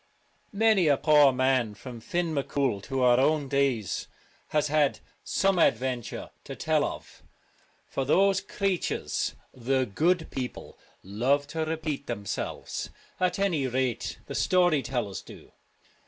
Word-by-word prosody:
Many 215 -5 +4
a 145 -2 +4
poor 150 -2 +6
man 130 -4 +1
from 120 +3 -9
Fin 170 +7 -2
M'Cool 135 -6 -1
to 135 -2 -1
our 125 0 +5
own 150 +1 +2
days 135 -7 0 0.4
has 150 -1 +1
had 150 -1 +2 0.2
some 195 -1 +1
such 170 - +5
adventure 125 -1 -5
to - - -7
tell - - +1
of, - - -6 0.7
for 135 - -2
those 190 +7 +3
creatures, 195 -2 -2 0.2
the 130 +1 0
'good 160 - 0
people,' 130 -2 -6 0.2
love 125 +9 +1
to 160 +1 -2
repeat 155 -3 -3
themselves. 105 -5 -4 0.3
At 180 -1 +1
any 175 -9 +1
rate 130 -1 -2
the - - -7
story 175 -5 +3
tellers 120 -8 -3
do. - - -14
140 Hz, 135 wpm, -27 LUFS, 125-160 Hz, 0.7 s, poor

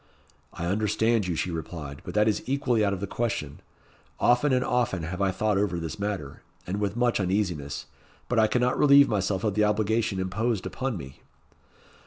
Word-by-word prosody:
"I 85 0 -5
understand 105 +2 +1
you," 85 - -1
she 90 - -2
replied; 80 -4 -6
"but - - -8
that 105 +1 +4
is 110 - +1
equally 125 -5 +1
out 100 - +2
of 95 -2 -3
the - - -1
question. 100 -10 -3 0.6
Often 125 +4 +3
and 125 0 +2
often 120 -8 0
have 90 +4 -4
I 100 - +3
thought 105 +1 0
over 100 -4 0
this 80 +2 -5
matter, 100 -9 -4 0.2
and 95 +3 -3
with 100 0 -1
much 120 -2 +2
uneasiness; 85 -7 -1 0.4
but 125 - +1
I 110 - +5
cannot 125 +2 +1
relieve 140 -1 +7
myself 100 -2 -1
of 105 -3 +1
the 105 +1 +2
obligation 105 -1 +1
imposed 100 +3 -1
upon 130 -5 -3
me." 65 -4 -10
105 Hz, 185 wpm, -26 LUFS, 90-115 Hz, 0.6 s, relieve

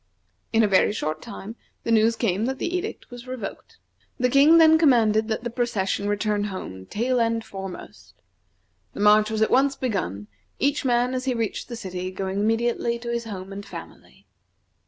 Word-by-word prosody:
In 225 0 +4
a - - +4
very 195 0 +4
short 155 -6 -3
time 220 -1 -8 0.3
the 230 - -2
news 225 +1 +4
came 220 -2 0
that 265 +1 -2
the 345 - -2
edict 375 -4 -5
was 245 +1 -10
revoked. 255 -6 -7 0.4
The 250 -1 +1
King 290 +5 +7
then 320 -1 +7
commanded 225 -8 +4
that 225 +1 -2
the 240 - -3
procession 205 -4 -1
return 205 0 0
home, 95 - -7
tail 245 +3 0
end 230 -1 0
foremost. 195 -2 -9 0.8
The - - -9
march 210 +1 +5
was 220 0 +1
at - - 0
once 275 +2 +3
begun, 190 - -3 0.3
each 280 +2 0
man, 245 0 +1
as 255 0 -3
he 255 -2 0
reached 225 -3 -3
the 240 - -5
city, 185 -4 -5
going 190 +1 -3
immediately 235 +2 0
to 235 0 -7
his 235 0 -2
home 195 -3 -7
and 200 +1 -7
family. - - -12
225 Hz, 180 wpm, -24 LUFS, 200-245 Hz, 0.8 s, King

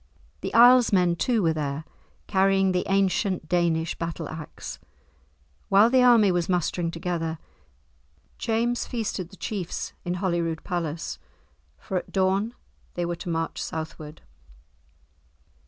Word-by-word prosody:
The - - -4
Isles 245 +1 +7
men, 180 -3 +3
too, 230 +3 +1
were 165 -1 +3
there, 150 0 -3 0.4
carrying 195 -1 +3
the 180 0 -1
ancient 195 -2 +1
Danish 170 -1 +1
battle 165 -1 -4
axe. 160 -1 -8 0.9
While 210 +4 +6
the 260 -1 +5
army 235 -5 +6
was 175 -1 0
mustering 175 -1 0
together, 165 -1 -3 1.0
James 235 +2 0
feasted 210 -7 -3
the 195 - -14
chiefs 190 -5 -4
in 175 0 -2
Holyrood 170 -3 -1
Palace, 170 -2 -3 0.6
for 190 - -4
at - - -5
dawn 195 +4 +1 0.4
they 175 - -1
were 175 0 -2
to 175 - -6
march 165 0 -2
southward. 155 -1 -6
180 Hz, 125 wpm, -25 LUFS, 165-200 Hz, 1.0 s, Isles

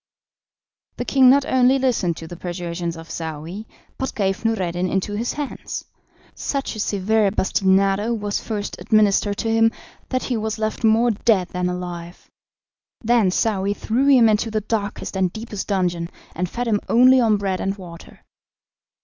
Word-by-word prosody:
The - - -3
king 265 -2 +5
not 280 +1 +5
only 260 0 +4
listened 230 -11 0
to 165 - -8
the 175 - -8
persuasions 170 -1 -4
of 165 0 -10
Saouy, 165 +6 -6 0.3
but 265 - -3
gave 195 -1 -1
Noureddin 185 -5 0
into 195 +2 -1
his 230 +4 -2
hands. 295 -2 -5 0.5
Such 275 -4 -3
a - - -7
severe 205 +1 +1
bastinado 195 +2 +2
was 205 -3 -2
first 210 -2 -4
administered 205 -1 +2
to 225 - -1
him, 225 0 +4 0.4
that 255 -1 -1
he 245 - -1
was 220 0 -3
left 215 +2 -3
more 225 +2 +4
dead 205 -4 +1
than 180 0 -2
alive; 175 -1 -7 0.7
then 230 -4 +3
Saouy 200 0 0
threw 245 +7 0
him 255 -5 +6
into 215 +1 +1
the 215 -1 -1
darkest 210 -2 -3
and 185 -2 +1
deepest 220 -2 -6
dungeon, 175 -4 -1 0.2
and 180 +1 -2
fed 245 +4 -3
him 210 -2 +2
only 255 +2 +6
on 220 -3 +3
bread 195 -2 -2
and 195 +1 -2
water. 170 -3 -12
205 Hz, 160 wpm, -22 LUFS, 185-225 Hz, 0.7 s, him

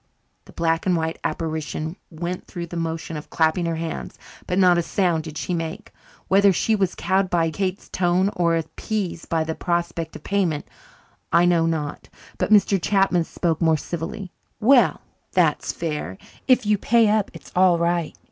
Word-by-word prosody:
The - - -15
black 165 +1 0
and 180 - +3
white 160 0 -2
apparition 160 0 -3
went 175 +2 -5
through 170 -1 -5
the 170 - -9
motion 165 -1 -3
of 150 - -9
clapping 160 +2 +1
her 165 - -1
hands, 165 0 -5 0.3
but 180 - -1
not 180 -2 +5
a - - +2
sound 170 -2 0
did 155 -1 -7
she 180 - -3
make. 165 -1 -4 0.4
Whether 200 +1 +5
he 215 +4 +2
was 190 -3 0
cowed 190 0 +1
by 165 -2 +1
Kate's 190 +3 -3
tone, 185 +2 +1
or 170 -1 +2
appeased 180 +2 -4
by 165 -1 +1
the 160 0 -3
prospect 170 -1 -2
of - - -10
payment, 180 -7 0 0.6
I 170 +1 +5
know 170 -2 +3
not, 155 -3 -3 0.3
but - - 0
Mr. 200 -2 +4
Chapman 195 -3 +2
spoke 165 -1 -2
more 160 -1 +4
civilly. 175 +4 -5 0.3
"Well, 245 +3 +4 0.3
that's - - +2
fair. 150 - -4 0.3
If 255 -2 +4
you 210 -1 +2
pay 230 +1 +4
up 210 -1 +2
it's - - -12
all 180 -1 +5
right." 170 -1 -1
170 Hz, 175 wpm, -23 LUFS, 165-190 Hz, 0.6 s, not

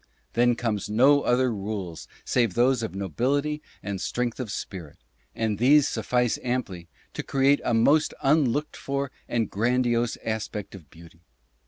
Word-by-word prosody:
Then 120 0 +3
come 115 -3 -1
no 135 +7 +5
other 125 -1 +2
rules 100 -5 -5 0.2
save 115 -7 +1
those 125 +1 +3
of 110 -4 -4
nobility 140 - -1 0.2
and 100 -2 -4
strength 120 0 -2
of 125 -4 -4
spirit; 85 -8 -7 0.4
and 110 -3 -1
these 140 +4 +5
suffice 120 +1 0
amply 115 -9 -3 0.3
to - - -3
create 140 +1 +2
a 120 - +1
most 145 +7 +3
unlooked 145 0 +2
for 140 0 -3 0.2
and 115 -3 0
grandiose 120 +2 +1
aspect 110 -2 -4
of 85 -8 -12
beauty. 85 +1 -16
120 Hz, 145 wpm, -26 LUFS, 105-130 Hz, 0.4 s, no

